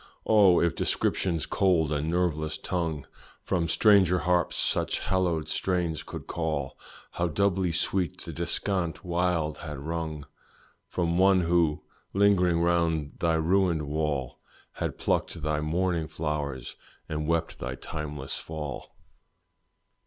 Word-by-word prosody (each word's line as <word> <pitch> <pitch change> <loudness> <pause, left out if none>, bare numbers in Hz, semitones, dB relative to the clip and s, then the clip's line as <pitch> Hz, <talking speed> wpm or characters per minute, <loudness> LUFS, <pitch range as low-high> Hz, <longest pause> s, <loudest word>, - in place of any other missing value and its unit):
Oh! 100 -5 +6
if 85 - +2
description's 85 -4 0
cold 85 -6 +2
and 75 +1 -1
nerveless 80 -3 0
tongue 80 -6 -2 0.4
From 85 -3 0
stranger 95 0 +5
harps 90 -1 +1
such - - +1
hallowed 90 -4 0
strains 85 -2 -1
could - - -8
call, 75 -5 -2 0.4
How 85 - -1
doubly 95 +1 +1
sweet 90 0 0
the - - -7
descant 85 +1 -1
wild 85 -3 0
had 75 -2 -6
rung, 80 0 -4 0.6
From 85 0 0
one 95 0 +5
who, 85 -3 +2 0.3
lingering 90 -4 +3
round 85 -3 +1
thy 85 -1 +2
ruined 85 0 +2
wall, 75 -3 -2 0.3
Had - - -4
plucked 80 - -1
thy 75 -1 0
mourning 85 +1 0
flowers 75 -6 -4 0.3
and 75 -1 -3
wept 85 0 -1
thy 65 0 -4
timeless 75 0 -5
fall. 75 -4 -7
85 Hz, 125 wpm, -27 LUFS, 75-90 Hz, 0.6 s, Oh